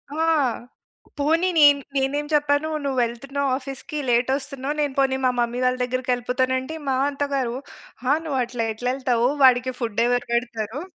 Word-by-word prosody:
ఆ! - - -5 1.0
పోనీ 325 +5 +2
నేన్ 290 -2 +7 0.2
నేనేం 275 +2 0
చెప్పాను, 295 +1 +2 0.2
"నువ్వెళ్తున్నావు 270 +2 -1
ఆఫీస్‌కి, 275 +4 -7
లేటొస్తున్నావు. 270 +3 0
నేను 285 -2 -1
పోనీ 270 -1 +2
మా 250 - +4
మమ్మీ 240 +1 0
వాళ్ళ 255 0 +2
దగ్గరికెళ్ళిపోతాను" 255 0 -1
అంటే, 310 +5 -7
మా 265 - +1
అత్త 285 0 -3
గారు 250 -3 -1 0.5
"ఆ! - - +5
నువ్వు 290 -5 -2
అట్లా 235 -1 -3
ఎట్లెళ్తవు. 245 0 0 0.2
వాడికి 255 0 +5
ఫుడ్డెవరు 240 +1 0
పెడతరు?" 235 +2 -2
260 Hz, 135 wpm, -23 LUFS, 245-280 Hz, 1.0 s, నేన్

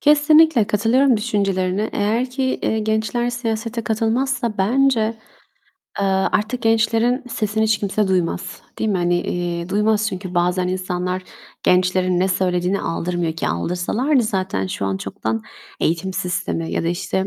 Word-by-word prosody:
Kesinlikle 300 -4 +5
katılıyorum 235 +6 +3
düşüncelerine. 200 -2 0
Eğer 225 +5 0
ki, 265 +1 -3 0.2
eee, 220 - 0
gençler 220 +3 0
siyasete 230 -1 -3
katılmazsa 230 +1 0
bence, 250 +5 +3 1.0
eee, 200 - +1
artık 210 +5 0
gençlerin 225 +2 +2
sesini 220 -1 -1
hiç 215 -1 +2
kimse 205 0 0
duymaz. 180 -3 -1 0.2
Değil 220 - 0
mi? 195 - +1
Hani, 175 0 +1
eee, 175 -1 -3
duymaz. 210 +2 +2
Çünkü 185 -2 -6
bazen 180 +1 +1
insanlar 185 0 -2 0.4
gençlerin 180 0 +2
ne 190 - +2
söylediğine 180 +1 0
aldırmıyor 170 0 -2
ki. 165 - -2
Aldırsalardı 180 - 0
zaten 185 - -1
şu 100 - -4
an 95 0 -1
çoktan 110 +3 -3 0.4
eğitim 180 +4 0
sistemi 180 -3 -2
ya - - 0
da, 165 - 0
işte, 190 +2 -1
200 Hz, 140 wpm, -20 LUFS, 180-225 Hz, 1.0 s, Kesinlikle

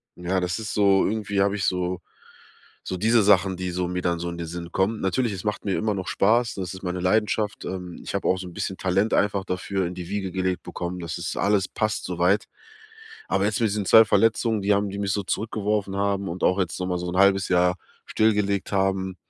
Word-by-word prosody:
Ja, 90 +2 -1
das 90 0 -1
ist 110 - -5
so 100 -2 +4
irgendwie 105 -2 -1
habe 100 +1 +2
ich 95 - -1
so 90 0 -1 0.9
so 95 - -3
diese 115 +4 +3
Sachen, 95 -2 +4
die 90 0 -3
so 90 0 -1
mir 90 0 -3
dann 85 -1 0
so 85 +1 -3
in 85 - -6
den 85 - -4
Sinn 85 0 -7
kommen. 105 +3 +1
Natürlich, 110 +4 0
es 95 - -7
macht 105 -1 -2
mir 100 - 0
immer 110 -1 0
noch 95 -1 -5
Spaß, 115 +3 +2
das 95 -3 -4
ist 95 +1 -10
meine 90 0 -3
Leidenschaft, 105 +2 0
ähm. 90 -2 -6
Ich - - -6
habe - - -1
auch 95 - +3
so 95 - -6
’n - - -9
bisschen 100 -1 -3
Talent 95 +4 +1
einfach 100 -1 +1
dafür 95 0 -2
in 90 - -6
die 90 -2 -7
Wiege 95 -3 -3
gelegt 95 -1 -1
bekommen, 90 +1 -5
das 85 -1 -5
ist 85 -1 -4
alles 100 -2 +2
passt 110 -1 -1
so 90 -1 -5
weit. 95 +4 +3 0.8
Aber 95 - +1
jetzt 110 - -1
mit 115 - +3
diesen 105 -1 -2
2 110 +3 +8
Verletzungen, 115 0 +2
die 100 +1 +3
haben 100 0 0
die 100 - -6
mich 100 -1 -1
so 100 - -1
zurückgeworfen 105 -1 -2
haben 100 -1 0
und 85 +2 -6
auch 90 +2 +3
jetzt 90 0 -2
noch 90 - -1
mal 90 - -1
so 90 0 -4
1/2 95 +1 +3
Jahr 90 0 +3 0.3
stillgelegt 105 -3 +1
haben. 95 -1 0
95 Hz, 235 wpm, -24 LUFS, 90-105 Hz, 0.9 s, 2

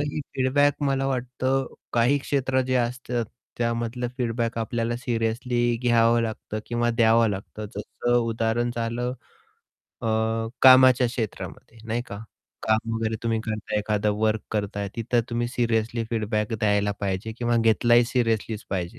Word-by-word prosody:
ही 145 +1 -2
feedback 145 +2 +2
मला 135 -1 +1
वाटतं 130 +1 -1 0.3
काही 120 +4 +3
क्षेत्र 135 -2 0
जे 130 - 0
असतात 120 -1 -1 0.3
त्यामधलं 120 +1 -1
फीडबॅक 115 -1 -1
आपल्याला 115 +1 -1
सिरियसली 120 0 -1 0.2
घ्यावं 120 -1 +4
लागतं 110 -1 -4
किंवा 120 0 0
द्यावं 115 -1 +4
लागतं. 105 +2 -6
जसं 120 +3 -1
उदाहरण 115 +1 0
झालं 120 +2 -2 0.9
अ, - - -2 0.6
कामाच्या 130 -1 +8
क्षेत्रामध्ये 115 -1 -6
नाही 120 +2 -1
का? 100 - -7 0.5
काम 110 +1 +1
वगैरे 115 0 -1
तुम्ही 115 -1 0
करताय, 110 -1 -2
एखादं 105 0 0
वर्क 110 0 +1
करताय 100 -1 -2
तिथं 120 +1 +1
तुम्ही 120 0 0
सिरियसली 115 -1 0
फीडबॅक 110 -1 -1
द्यायला 105 -2 +1
पाहिजे 100 +2 -2
किंवा 120 -1 +1
घेतला 115 +1 +3
ही 120 0 +6
सीरियसलीच 115 -3 -1
पाहिजे. 90 -3 -3
115 Hz, 135 wpm, -25 LUFS, 110-125 Hz, 0.9 s, कामाच्या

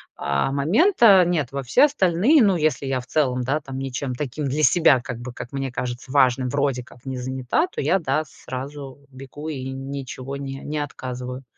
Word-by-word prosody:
а, 70 - -1
момента. 145 - +1 0.5
Нет. 160 -7 0
Во 140 0 -3
все 125 - +4
остальные, 250 - +3
ну 200 -5 +4
если 155 -3 0
я 135 -1 -1
в 125 - -15
целом, 130 -4 +1
да 135 +5 0
там, 135 -3 -8
ничем 135 -1 -4
таким 145 +2 -4
для 140 +3 -1
себя, 150 -6 +5
как 120 -1 -6
бы, 120 0 -7
как 120 - -8
мне 135 -1 -3
кажется, 125 +1 -5
важным, 130 -2 +3
вроде 140 -2 0
как 125 - -18
не 130 -1 -4
занята, 130 - -1
то 370 - -5
я 190 - +2
да, 155 0 0
сразу 135 0 -8
бегу 135 +3 -9
и 135 -3 -5
ничего 135 0 -6
не 135 -1 -6
не 150 +1 -4
отказываю. 125 -2 -6
135 Hz, 190 wpm, -23 LUFS, 130-150 Hz, 0.5 s, себя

